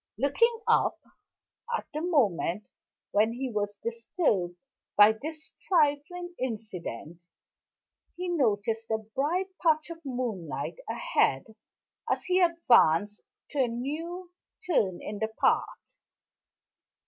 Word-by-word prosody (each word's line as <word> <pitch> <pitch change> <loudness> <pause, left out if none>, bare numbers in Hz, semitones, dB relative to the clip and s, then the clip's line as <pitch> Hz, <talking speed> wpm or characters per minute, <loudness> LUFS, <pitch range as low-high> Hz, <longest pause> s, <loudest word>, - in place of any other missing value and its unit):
Looking 450 - +2
up, - - +3 0.8
at - - -8
the 305 - -2
moment 210 - +1 0.5
when 215 +2 +3
he 255 +1 -3
was 205 -1 -2
disturbed 230 - 0 0.4
by 205 +1 +9
this 310 +8 -7 0.2
trifling 345 +2 +1
incident, 185 - -5 0.9
he 360 +1 -4
noticed 225 - 0
a 220 - +2
bright 285 - -2
patch 315 -1 +2
of 330 0 -9
moonlight 220 - -4
ahead - - +1 0.5
as - - 0
he 370 0 +2
advanced 235 - +4 0.3
to 290 - -3
a 260 - +4
new 325 +9 -5 0.4
turn 195 - +1
in 205 0 -5
the 220 0 -1
path. - - 0
250 Hz, 110 wpm, -28 LUFS, 210-330 Hz, 0.9 s, by